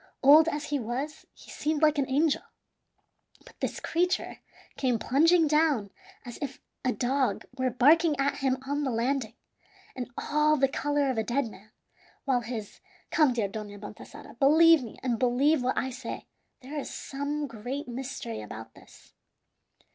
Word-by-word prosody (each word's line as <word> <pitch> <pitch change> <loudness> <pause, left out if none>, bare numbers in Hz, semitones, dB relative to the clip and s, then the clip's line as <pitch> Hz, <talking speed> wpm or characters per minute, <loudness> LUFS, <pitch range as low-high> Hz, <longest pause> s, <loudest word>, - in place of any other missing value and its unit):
Old 305 +4 +8
as 300 -2 -3
he 290 - +1
was, 260 +6 -5
he - - -15
seemed 310 0 -1
like 305 -1 +4
an 270 - 0
angel. 285 +2 +2 1.0
But - - -17
this - - -3
creature 360 +2 -1 0.4
came 250 -3 +1
plunging 320 +8 +4
down 295 -9 +2 0.3
as 240 - -8
if 280 0 -5 0.2
a 255 - +2
dog 255 -5 0
were 260 -1 0
barking 295 +5 +4
at 280 +1 +1
him 265 -2 +1
on 290 +1 -1
the 270 - 0
landing, 240 -1 -1 0.6
and 250 -2 -5
all 300 0 +2
the 270 0 +4
color 290 0 0
of 235 - -2
a - - +1
dead 240 +1 -1
man, 210 +2 -16 0.6
while 260 -3 +2
his 225 -3 -6 0.3
come, 300 -5 +4
dear 225 -4 0
Dona 205 0 -7
Baltasara, 210 +3 -11
believe 320 +3 +6
me, 235 -4 -9
and 240 -3 0
believe 265 +4 +3
what 255 +1 -1
I 260 - -1
say: 250 -1 -7 0.4
there 285 +4 -5
is - - -6
some 290 +2 -4
great 255 +3 -6
mystery 245 - -5
about 110 +1 -9
this." - - -18
270 Hz, 160 wpm, -28 LUFS, 240-295 Hz, 1.0 s, Old